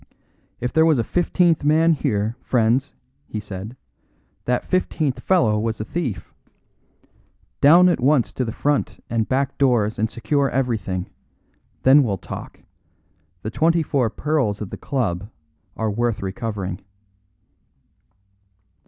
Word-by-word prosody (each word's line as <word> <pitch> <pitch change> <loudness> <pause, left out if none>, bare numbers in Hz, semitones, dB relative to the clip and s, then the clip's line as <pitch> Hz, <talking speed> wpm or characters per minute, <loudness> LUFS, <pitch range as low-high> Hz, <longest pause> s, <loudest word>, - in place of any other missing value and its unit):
"If 125 - -3
there 160 - +5
was 160 -3 +4
a 115 - +1
fifteenth 175 - +1
man 160 +3 +4
here, 110 -5 -1
friends," 125 +3 +1 0.3
he 110 - -4
said, 105 +4 -8 0.7
"that 125 0 0
fifteenth 155 -6 0
fellow 110 - +2
was 110 +1 -2
a 110 - -3
thief. 145 - -4 1.3
Down 170 +6 +7
at 175 - +2
once 135 -1 +2
to 130 - -1
the 115 - -3
front 145 +5 -1
and 115 -2 0
back 135 +1 -1
doors 120 -6 +2
and 110 +1 +1
secure 140 +4 0
everything; 110 -8 -2 0.7
then 135 +3 +7
we'll 105 -7 0
talk. - - -9 0.8
The 110 - -4
twenty 165 +4 +2
four 130 -6 +1
pearls 130 -6 -1
of 105 - -6
the - - -4
club 105 -8 -2 0.5
are 110 -1 -1
worth 115 -1 -1
recovering." 95 -2 -4
125 Hz, 130 wpm, -22 LUFS, 110-145 Hz, 1.3 s, Down